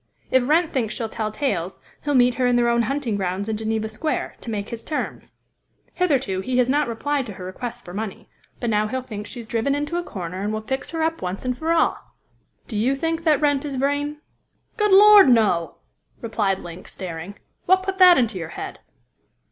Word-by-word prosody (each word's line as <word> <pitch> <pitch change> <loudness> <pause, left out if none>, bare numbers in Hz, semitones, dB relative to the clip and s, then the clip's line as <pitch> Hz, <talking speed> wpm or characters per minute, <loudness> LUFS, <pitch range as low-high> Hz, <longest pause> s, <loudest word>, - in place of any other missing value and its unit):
If 255 -1 +3
Wrent 325 +2 +3
thinks 235 -5 -1
she'll 225 -2 -3
tell 215 -1 -3
tales, 195 - -2 0.2
he'll 290 -1 0
meet 245 -1 +5
her 250 - +4
in 245 - +3
their 240 0 +3
own 235 0 +3
hunting 240 -2 -1
grounds 190 +1 -2
in 220 - -1
Geneva 220 0 -2
Square, 220 +9 -3
to - - -7
make 205 -2 -3
his 230 -1 -7
terms. 305 - -4 0.6
Hitherto 270 - +1
he 250 +5 -2
has 250 -1 +4
not 290 +2 +2
replied 270 +3 -2
to 210 - -6
her 180 -1 -9
requests 240 +6 -6
for 175 - -10
money, 210 0 -5 0.3
but 240 -2 -1
now 210 0 +2
he'll 260 +3 -3
think 210 -4 -7
she 230 +4 -8
is - - -11
driven 235 +4 0
into 295 +4 -2
a 350 - -1
corner, 185 - -6
and 205 +1 -1
will 215 0 -2
fix 265 +5 -4
her 325 -1 -2
up 325 +1 -1
once 185 +5 -4
and 250 0 0
for 320 +6 -2
all." 335 - +2 0.7
"Do 215 - -3
you 255 +5 +2
think 325 +3 -2
that 310 -3 +3
Wrent 290 -2 +2
is 285 -2 -4
Vrain?" 285 +2 -1 0.6
"Good 420 -2 +1
Lord! 410 -4 +9
no!" 200 -9 +3 0.4
replied 210 -4 0
Link, 175 +1 -10
staring. 180 +1 -7 0.3
"What 375 +1 +4
put 380 0 -3
that 360 -1 +9
into 225 -6 +1
your 165 -2 -5
head?" - - -6
240 Hz, 210 wpm, -23 LUFS, 210-290 Hz, 0.7 s, Lord